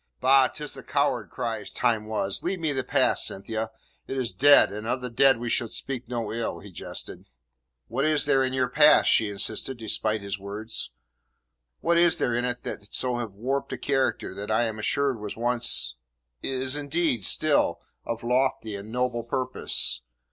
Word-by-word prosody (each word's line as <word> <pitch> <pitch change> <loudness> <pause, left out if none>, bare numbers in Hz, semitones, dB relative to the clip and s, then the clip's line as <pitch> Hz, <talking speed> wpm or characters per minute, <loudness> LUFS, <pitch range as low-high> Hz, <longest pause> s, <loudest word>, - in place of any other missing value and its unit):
"Bah! 130 0 +5
'Tis 150 +2 -6
the 135 - -8
coward 130 -6 0
cries 110 -3 -4
"time 115 -3 0
was"! 100 -3 -1
Leave 185 +1 -2
me 160 -3 0
the 135 -2 -1
past, - - +2
Cynthia. 110 +3 -4 0.4
It 135 - -4
is 120 -7 -1
dead, 140 +3 +6
and 105 +2 -6
of 125 +2 0
the 125 -1 -5
dead 135 +2 +5
we 120 +1 -5
should 115 -1 0
speak 130 -3 -5
no 115 -3 -3
ill," 115 0 -3
he - - -12
jested. - - -6 0.6
"What 130 +4 -2
is 155 -1 +3
there 135 -2 +3
in 130 - -1
your 130 -1 +1
past?" 150 +3 +5
she 110 - +3
insisted, 105 +5 -2
despite 110 -1 0
his 100 0 -4
words. 105 +3 -4 0.9
"What 170 0 +3
is 170 -1 +5
there 120 - 0
in 120 +1 0
it 125 0 -3 0.2
so 125 -1 0
to 120 - -2
have 115 -5 -5
warped 130 +7 -3
a - - -3
character 135 -7 -1
that 100 +2 -7
I 110 +2 +2
am 110 -2 -3
assured 135 +2 0
was 105 0 -6
once 120 - +1 0.4
is, 130 +1 0
indeed, 145 - -1
still - - +3 0.2
of 115 0 -5
lofty 125 -3 0
and 100 +2 -8
noble 125 -1 -1
purpose? 130 - 0
120 Hz, 185 wpm, -26 LUFS, 110-135 Hz, 0.9 s, dead